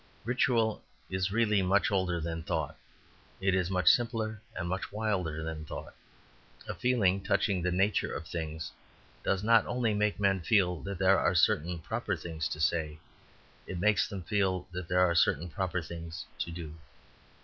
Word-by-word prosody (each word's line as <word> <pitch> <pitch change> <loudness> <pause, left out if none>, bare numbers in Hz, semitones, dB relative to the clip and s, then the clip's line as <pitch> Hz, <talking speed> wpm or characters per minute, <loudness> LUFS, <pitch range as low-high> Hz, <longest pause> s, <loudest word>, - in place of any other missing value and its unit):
Ritual 115 -3 +1 0.3
is 95 +1 0
really 105 -2 +3
much 95 +4 +2
older 95 -3 +1
than 80 0 -3
thought; 80 - -2 0.6
it 95 0 +2
is 95 -1 +1
much 90 -3 -1
simpler 110 -2 +3
and 85 -1 -3
much 95 +2 -3
wilder 95 -7 -1
than 80 -1 -4
thought. 75 - -7 0.7
A - - -3
feeling 100 -7 +2
touching 95 -3 +1
the 90 - +1
nature 95 +4 +1
of 80 - -5
things 80 -1 -4 0.5
does 95 0 0
not 115 0 +5
only 120 -3 0
make 105 0 0
men 100 -1 +3
feel 90 -2 +2
that 100 -1 -5
there 95 +1 +4
are 90 - +2
certain 85 +1 +3
proper 105 +4 -2
things 80 -2 -4
to 75 - -5
say; 80 -1 0 0.7
it 95 - -4
makes 105 +2 +3
them 95 -3 -6
feel 95 0 0
that 90 -1 -5
there 90 +1 +2
are 90 -2 +4
certain 85 0 +2
proper 90 0 -2
things 85 0 -7
to - - -2
do. 85 -2 -7
95 Hz, 170 wpm, -30 LUFS, 85-105 Hz, 0.7 s, not